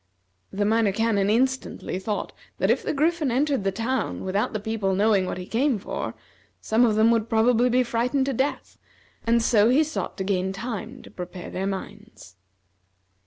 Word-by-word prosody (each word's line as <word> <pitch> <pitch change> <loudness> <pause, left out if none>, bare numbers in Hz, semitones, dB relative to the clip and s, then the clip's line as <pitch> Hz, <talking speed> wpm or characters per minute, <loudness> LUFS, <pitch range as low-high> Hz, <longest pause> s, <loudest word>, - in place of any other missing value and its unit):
The 205 +1 -1
Minor 220 -1 +3
Canon 205 -1 +1
instantly 260 -4 0
thought 205 +2 -3 0.2
that - - +2
if - - +1
the - - -2
Griffin 310 0 +1
entered 270 -1 +1
the 195 - +1
town 230 +7 -2
without 195 +2 -1
the 215 - -3
people 205 -3 -1
knowing 200 -2 +3
what - - -3
he 180 - -6
came 250 +4 +1
for, 200 - -5 0.4
some 225 +3 +2
of 220 -3 +2
them 220 +2 +4
would 225 -1 +1
probably 235 +2 +3
be 250 +1 +3
frightened 245 +3 0
to 275 - -1
death, 265 +4 -2 0.5
and 230 0 +3
so 220 -2 +4
he 275 +6 +4
sought 310 +1 -4
to 190 - -2
gain 190 -1 -1
time 230 +3 -6
to - - -14
prepare 180 0 -8
their 190 +1 -2
minds. 190 - -8
225 Hz, 180 wpm, -25 LUFS, 195-250 Hz, 0.5 s, them